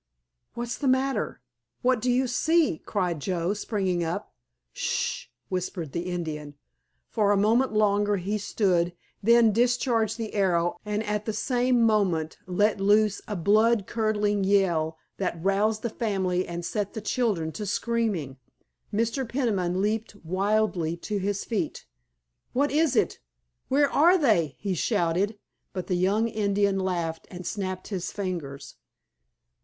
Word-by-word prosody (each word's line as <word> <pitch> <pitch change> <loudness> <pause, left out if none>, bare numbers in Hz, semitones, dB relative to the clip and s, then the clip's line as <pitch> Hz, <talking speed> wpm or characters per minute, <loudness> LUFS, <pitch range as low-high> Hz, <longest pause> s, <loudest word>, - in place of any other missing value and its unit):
"What's 240 0 -4
the 280 - -1
matter? 260 - 0 0.4
What 250 -2 +3
do 250 - 0
you 250 +2 +3
see?" 305 - +2
cried 180 -6 -1
Joe, 175 +4 -1
springing 195 -4 -1
up. 165 0 -4 0.4
"Sh - - -12
sh!" - - -1 0.2
whispered 180 -4 -3
the 170 +4 -3
Indian. 150 -4 -4 0.5
For 205 -2 +1
a 205 - +3
moment 225 +5 +3
longer 205 -1 +3
he 200 +3 -2
stood, 180 -4 +1 0.3
then 235 +1 +5
discharged 235 -1 +1
the 225 -2 -5
arrow 175 -4 +1
and 210 0 -2
at 210 -1 -2
the 220 - -2
same 245 0 +2
moment 190 -8 +1
let 205 +3 +2
loose 210 +1 +3
a 210 - -3
blood 215 +4 +3
curdling 210 -2 0
yell 175 -5 +2 0.2
that 180 -3 -2
roused 205 +4 +1
the 235 - 0
family 190 -6 -1
and 170 0 -5
set 205 +3 -2
the 220 - -4
children 205 -8 0
to 210 +5 -5
screaming. 205 - -1 0.5
Mr. 230 +5 0
Peniman 195 -8 0
leaped 215 0 -1
wildly 190 -2 0
to 205 +4 -3
his 200 +1 -1
feet. 225 -4 -3 0.7
"What 285 +3 +2
is 310 0 +2
it? - - +1 0.5
Where 280 +1 +3
are 345 +6 +5
they?" 205 - +2
he 200 -2 -2
shouted, 195 +2 0 0.4
but 185 -2 -4
the - - -2
young 195 +5 +2
Indian 200 -2 +1
laughed 170 -4 -2
and 180 0 -8
snapped 185 -2 -4
his 190 -4 -3
fingers. 170 -9 -5
205 Hz, 145 wpm, -26 LUFS, 180-225 Hz, 0.7 s, then